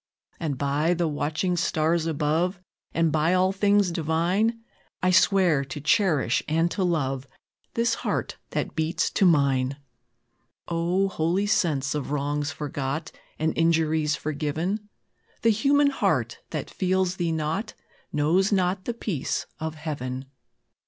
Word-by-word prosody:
And, 150 -5 -2
by 145 +5 +1
the 170 -1 0
watching 155 +4 -1
stars 165 -1 +1
above, 165 +4 0 0.3
And 165 -1 +2
by 160 +4 +2
all 185 +1 +3
things 200 -1 +3
divine, 175 +8 0 0.4
I 185 - +4
swear 185 -6 +4
to 135 +2 -6
cherish 150 - +2
and 165 +3 +1
to 195 - -1
love 135 -6 -1 0.5
This 230 0 +2
heart - - -2
that - - -2
beats 160 +1 0
to 195 - +3
mine!" 140 -4 +2 0.9
O, 175 +3 +1
holy 180 +2 0
sense 150 -10 +1
of 150 -2 -3
wrongs 145 +1 -1
forgot, 145 +1 -4 0.3
And 160 +1 0
injuries 160 -2 +2
forgiven! 155 +8 -3 0.5
The 230 - +5
human 280 +6 +3
heart - - 0
that - - -4
feels 185 0 0
thee 170 -2 0
not, 160 +7 -2 0.4
Knows 170 +7 +2
not 185 -1 +1
the 240 - -2
peace 185 - -2
of 160 0 -4
Heaven. 135 -4 -4
165 Hz, 130 wpm, -26 LUFS, 150-185 Hz, 0.9 s, The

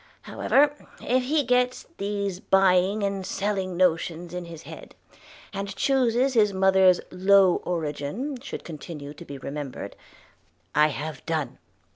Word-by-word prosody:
However, 290 +1 +2 0.3
if 255 +1 0
he 295 +2 +2
gets 250 0 +1
these 200 -2 -2
buying 195 +2 +3
and 195 -1 -1
selling 190 -2 -2
notions 175 -1 0
in 180 -1 -5
his 165 -2 -10
head, - - -11 0.6
and 200 0 -4
chooses 260 0 +2
his 210 -4 +3
mother's 190 -1 +4
low 190 0 +5
origin 170 - -3
should 275 - -7
continue 150 -2 -8
to 150 - -11
be 140 - -8
remembered, 140 0 -6 0.8
I 150 +1 +5
have 150 0 -5
done. 160 -3 -2
190 Hz, 130 wpm, -25 LUFS, 165-210 Hz, 0.8 s, low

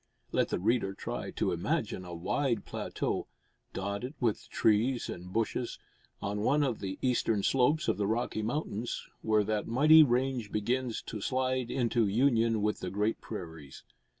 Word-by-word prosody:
Let - - +1
the - - 0
reader 100 0 +1
try - - -4
to - - -1
imagine 90 - -1
a 90 -1 -7
wide 115 +6 -1
plateau, - - -3 0.4
dotted 100 +8 -4
with 115 -5 -1
trees 115 +4 +2
and 90 +1 -7
bushes, 115 +3 -1 0.5
on 100 +1 -2
one 145 +7 +3
of 125 -6 -1
the 95 -1 -4
eastern 115 -5 +1
slopes 135 +4 +2
of - - +1
the 100 -1 0
Rocky 110 0 -1
Mountains, 120 -1 -3
where 110 -1 +3
that 105 0 -1
mighty 155 +7 +7
range 125 -4 +1
begins 120 +3 -1
to 105 - -6
slide 130 +1 0
into 120 -4 +1
union 115 -1 +2
with 105 0 0
the 90 - -4
great 105 +4 -1
prairies. 80 -9 -8
115 Hz, 155 wpm, -31 LUFS, 105-125 Hz, 0.5 s, mighty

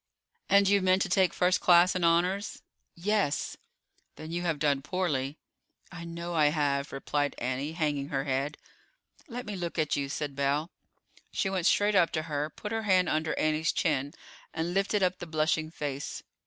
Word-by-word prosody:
"And 200 0 +5
you 200 0 +4
meant 185 +1 +3
to 195 - -4
take 185 0 +4
a - - -18
first 180 0 +2
class 175 +1 +6
in 185 - -2
honors?" 180 +5 +1 0.3
"Yes." 195 -4 0 0.6
"Then 155 +1 -8
you 175 +1 -2
have 165 -3 0
done 140 -2 +1
poorly." 150 -5 -2 0.5
"I 175 -2 -8
know 170 +1 -5
I 155 -3 +4
have," 145 -2 0
replied 145 +1 -1
Annie, 130 +5 -3
hanging 145 -4 -1
her 135 -1 -1
head. 140 +2 -2 0.7
"Let 245 -2 -6
me 210 - -5
look 175 -2 -4
at 155 -2 +1
you," 140 -1 -2
said 145 0 -4
Belle. 140 +4 0 0.6
She 195 - -1
went 185 -2 +1
straight 205 +1 +3
up 180 -4 +4
to 155 - -1
her, 150 -1 -2
put 210 +6 -8
her 225 0 -1
hand 185 -4 +3
under 155 +1 -1
Annie's 155 +1 +1
chin, 145 -2 -1 0.4
and 165 +2 -2
lifted 195 +1 +1
up 185 0 +1
the 175 - -7
blushing 155 0 0
face. 145 -3 -5
165 Hz, 180 wpm, -29 LUFS, 145-185 Hz, 0.7 s, class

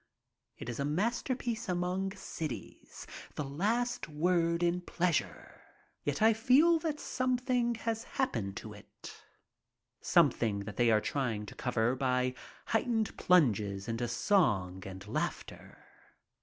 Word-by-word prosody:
It - - -8
is 120 +1 -4
a - - +1
masterpiece 230 - -1
among 180 +2 -1
cities, 155 - -7 0.3
the 150 - -2
last 220 - -1
word 170 +2 +1
in 175 +1 +1
pleasure. 175 -2 -2 0.4
Yet 145 +8 -1
I 225 +1 +7
feel 270 +9 +5
that 310 -2 -2
something 250 -2 0
has 225 0 -3
hap 265 -1 +1
pened 100 -4 -3
to - - -7
it, - - -12 0.9
something 105 -4 +3
that 105 0 -8
they 120 -1 +4
are 110 -1 +4
trying 115 -7 -2
to - - -9
cover 120 0 0
by 125 -1 +1 0.3
heightened 225 -1 0
plunges 105 - +2
into 115 +1 -2
song 115 - +1
and 95 +1 -8
laughter. - - -5
170 Hz, 130 wpm, -32 LUFS, -, 0.9 s, I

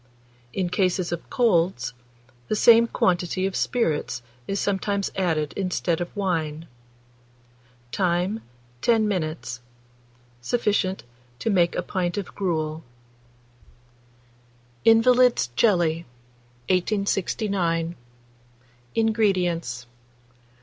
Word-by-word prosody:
In 185 +3 -1
cases 185 -2 +1
of 170 - -5
colds, 170 - +1 0.5
the - - 0
same 230 +2 +6
quantity 180 -2 0
of 195 - -2
spirits 160 - -1 0.2
is 195 0 -1
sometimes 200 0 -1
added 160 -6 0
instead 180 -3 -1
of 175 - -5
wine. 165 -5 -1 1.3
Time. 180 - 0 0.4
10 225 -2 +3
minutes. 155 - -3 0.8
Sufficient 195 - 0 0.3
to 225 - -1
make 175 -3 +3
a - - -1
pint 180 +1 -2
of 200 - -4
gruel. 160 -4 -2 2.0
INVALID'S 245 - +5
JELLY. 170 - +2 0.6
1869. 185 -3 0 1.0
INGREDIENTS. 180 - +1
185 Hz, 85 wpm, -24 LUFS, 165-205 Hz, 2.0 s, same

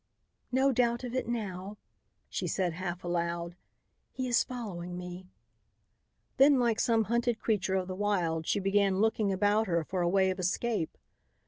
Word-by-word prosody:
"No 265 +2 +3
doubt 240 -1 +1
of 245 -1 -5
it 255 - -1
now," 205 -4 -4 0.5
she - - -3
said 180 -3 0
half 180 +1 -5
aloud. 170 0 -2 0.6
"He 260 -1 -3
is 240 -1 +3
following 180 -8 -6
me." 180 +1 -7 1.1
Then, 275 0 +6
like 235 -3 +2
some 225 -2 +3
hunted 235 +2 0
creature 200 -4 0
of 185 -1 0
the 185 - -4
wild, 180 -5 0
she - - +1
began 195 0 +2
looking 215 -1 +2
about 205 +3 +2
her 170 -2 +1
for 185 +3 -3
a 175 - +2
way 190 0 +3
of 185 - -5
escape. 190 0 -1
195 Hz, 160 wpm, -30 LUFS, 180-230 Hz, 1.1 s, Then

